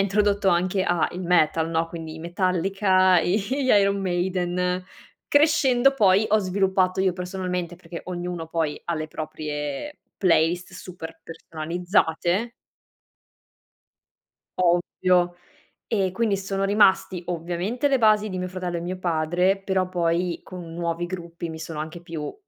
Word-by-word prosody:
introdotto 200 0 +2
anche 185 +2 +2
a 175 -2 +1
il 180 - -6
metal, 165 -2 +2
no, 165 0 +1
quindi 160 -2 -7
i - - -9
Metallica, 185 +1 +2
gli 190 +4 +1 0.3
Iron 200 -3 +4
Maiden. 180 0 -1 0.4
Crescendo 275 -3 +4
poi 205 -3 +4
ho 215 - +4
sviluppato 190 -1 +1
io 190 -1 +2
personalmente, 180 -1 -4
perché 170 -1 -9
ognuno 175 -2 -5
poi 160 -3 -2
ha 170 - 0
le 155 0 -3
proprie 155 - -5 0.2
playlist 175 0 +2
super 165 -3 -9
personalizzate. 175 +5 -1 2.1
Ovvio. 175 0 +2 0.5
E 195 -4 0
quindi 205 -1 0
sono 195 0 -2
rimasti, 195 -3 +3
ovviamente 175 - -2
le 270 -2 +2
basi 215 -2 +3
di 185 - -4
mio 185 0 -3
fratello 180 -1 -4
e - - -5
mio 180 +2 -4
padre, 175 +3 +1
però 190 -1 0
poi 175 0 0
con 175 -3 -9
nuovi 170 0 -2
gruppi 170 -2 -6
mi 160 - -7
sono 160 -1 -6
anche 160 +2 -6
più 165 -3 -6
180 Hz, 135 wpm, -24 LUFS, 170-195 Hz, 2.1 s, Iron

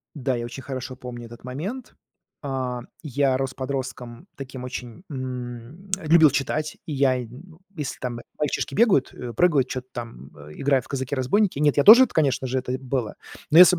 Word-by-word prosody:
Да, 135 -2 -1
я 120 - -3
очень 120 +3 -7
хорошо 130 -1 -5
помню 120 -2 -8
этот 120 +1 -13
момент. 185 - -5 0.5
А, 130 -3 -2 0.2
я 140 -3 +1
рос 135 -1 -2
подростком 130 +2 -5
таким 135 -2 -7
очень 125 +1 -7
м, 130 +5 -6
любил 160 -3 +6
читать. 150 +3 -1
И 155 - -4
я, 135 -2 +3
м, 145 +9 -11 0.2
если 150 -5 -4
там 120 -2 -4 0.2
мальчишки 150 -2 -1
бегают, 200 - +4
э, 120 -1 -7
прыгают, 140 -1 +3
чё-то 130 0 -5
там, 95 - -8
э, 75 +1 -12
играют 135 -3 +1
в - - -17
казаки-разбойники, 140 - 0
нет, 145 -1 +3
я 145 - +5
тоже 240 +5 +11
это 255 - -9
конечно 135 -4 +2
же, 130 +1 0
это 130 0 -3
было. 130 -4 -3 0.3
Но 155 - +7
если 180 +1 +10
б - - -4
130 Hz, 185 wpm, -24 LUFS, 125-150 Hz, 0.5 s, тоже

